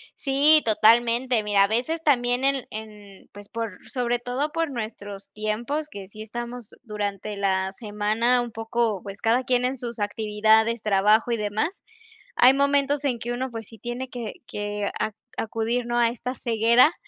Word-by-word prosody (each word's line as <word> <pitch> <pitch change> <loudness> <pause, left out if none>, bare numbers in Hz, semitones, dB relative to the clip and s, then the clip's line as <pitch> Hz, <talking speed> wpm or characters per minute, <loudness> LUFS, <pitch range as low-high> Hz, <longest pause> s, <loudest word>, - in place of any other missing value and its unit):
Sí, 290 +3 +4
totalmente. 230 +2 +4
Mira, 205 -1 +3
a - - +3
veces 250 +10 -1
también 245 -3 +2
en 275 -2 +2
en 210 -2 -10
pues 205 0 -12
por 225 -4 -5
sobre 245 -2 0
todo 250 +5 -2
por 330 -1 -1
nuestros 205 -4 -7
tiempos 235 +8 -2
que 200 -9 -9
sí 215 +2 -9
estamos 240 +1 -7
durante 205 -1 -4
la 190 -1 0
semana 220 +3 +1
un 240 -1 -5
poco 225 -2 -1
pues 200 -1 -9
cada 235 +3 +2
quien 250 -1 +1
en 260 +2 -1
sus 235 -2 -6
actividades, 220 +2 +2
trabajo 215 +3 +3
y 235 - +1
demás. 215 - -2 0.5
Hay 255 - +7
momentos 280 +1 +2
en 260 -4 0
que 235 +1 -5
uno 255 +2 -2
pues 225 -2 -7
sí 225 - -14
tiene 245 +2 -5
que 240 -4 -6
que 205 0 -3
a - - 0 0.3
acudir, 230 +2 -1
no 240 0 -1
a 235 -1 +4
esta 250 +2 -5
ceguera 235 +5 +4
230 Hz, 170 wpm, -25 LUFS, 210-250 Hz, 0.5 s, Hay